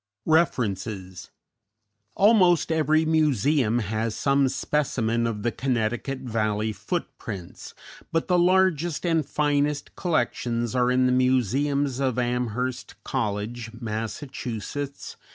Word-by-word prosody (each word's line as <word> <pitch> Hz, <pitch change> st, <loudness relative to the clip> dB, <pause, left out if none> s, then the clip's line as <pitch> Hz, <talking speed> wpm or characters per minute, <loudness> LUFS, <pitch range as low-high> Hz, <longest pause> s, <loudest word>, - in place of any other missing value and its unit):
REFERENCES 105 Hz, -, 0 dB, 0.9 s
_Almost 185 Hz, -6 st, +4 dB
every 155 Hz, 0 st, +2 dB
museum 145 Hz, -6 st, +2 dB
has 110 Hz, 0 st, -2 dB
some 140 Hz, -1 st, +2 dB
specimen 120 Hz, -4 st, 0 dB
of 105 Hz, -3 st, -4 dB
the 120 Hz, -, +1 dB
Connecticut 125 Hz, +2 st, -2 dB
Valley 110 Hz, -3 st, -1 dB
footprints, 95 Hz, -3 st, -6 dB, 0.4 s
but 165 Hz, 0 st, 0 dB
the 180 Hz, -2 st, +3 dB
largest 175 Hz, -3 st, +2 dB
and 165 Hz, -2 st, +2 dB
finest 145 Hz, 0 st, 0 dB
collections 120 Hz, -, -1 dB
are 125 Hz, -1 st, +2 dB
in 130 Hz, 0 st, +3 dB
the 125 Hz, -, +3 dB
museums 130 Hz, +2 st, +1 dB
of 130 Hz, -3 st, 0 dB
Amherst 125 Hz, 0 st, -2 dB
College, 110 Hz, +2 st, -3 dB
Mass. 110 Hz, +1 st, -4 dB
125 Hz, 100 wpm, -25 LUFS, 115-150 Hz, 0.9 s, Almost